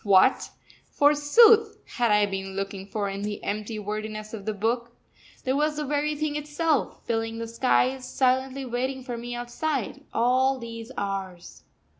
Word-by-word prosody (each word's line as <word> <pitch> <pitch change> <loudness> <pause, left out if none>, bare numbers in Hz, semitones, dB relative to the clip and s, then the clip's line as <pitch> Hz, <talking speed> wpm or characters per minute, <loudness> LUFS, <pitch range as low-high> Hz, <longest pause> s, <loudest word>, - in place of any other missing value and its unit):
What, 200 +4 +4 0.4
forsooth, 295 +11 +5
had 240 -2 0
I 210 0 +4
been 195 -1 -5
looking 195 0 -4
for 205 0 -2
in 195 0 -4
the 205 0 -4
empty 215 +2 -3
wordiness 215 +1 -5
of 205 -3 -7
the 215 - -1
book? 235 +3 -1 0.5
There 260 +1 0
was 300 +1 +1
the 300 0 -3
very 295 +1 0
thing 300 0 -2
itself, 300 0 -1
filling 225 -1 -1
the 230 0 -4
skies, 255 +2 +1
silently 260 +1 +1
waiting 260 +2 -2
for 250 -2 -5
me 240 +1 -5
outside, 245 +2 -3
all 255 +3 +2
these 230 0 -8
hours! 195 -3 -5
240 Hz, 155 wpm, -26 LUFS, 210-270 Hz, 0.5 s, forsooth